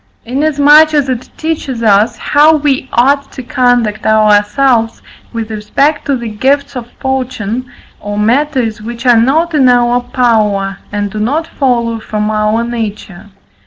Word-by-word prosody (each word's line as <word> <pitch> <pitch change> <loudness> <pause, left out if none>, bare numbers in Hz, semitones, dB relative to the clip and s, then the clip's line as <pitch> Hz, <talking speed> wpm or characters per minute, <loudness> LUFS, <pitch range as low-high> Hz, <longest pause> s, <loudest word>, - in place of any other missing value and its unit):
Inasmuch 295 +4 +3
as 285 -2 +1
it 255 -1 -4
teaches 295 -7 -4
us, 210 0 +2
how 300 +2 +3
we 280 -3 -1
ought 275 +4 +1
to 260 - -8
conduct 245 -4 0
ourselves 220 +3 +2 0.3
with 225 -1 -5
respect 245 +8 -1
to 280 - +1
the 235 -1 -6
gifts 270 +6 -1
of 240 -1 -7
fortune, 255 -3 -3 0.3
or 205 0 -6
matters 235 0 0
which 235 +3 -8
are 240 -2 +5
not 320 +8 +1
in 270 -4 +4
our 245 0 +2
power, 215 -6 0
and 205 -1 -3
do 215 - -5
not 285 +10 -1
follow 235 -7 -1
from 215 0 -3
our 215 +2 0
nature. 215 -5 -6
240 Hz, 145 wpm, -12 LUFS, 215-275 Hz, 0.3 s, are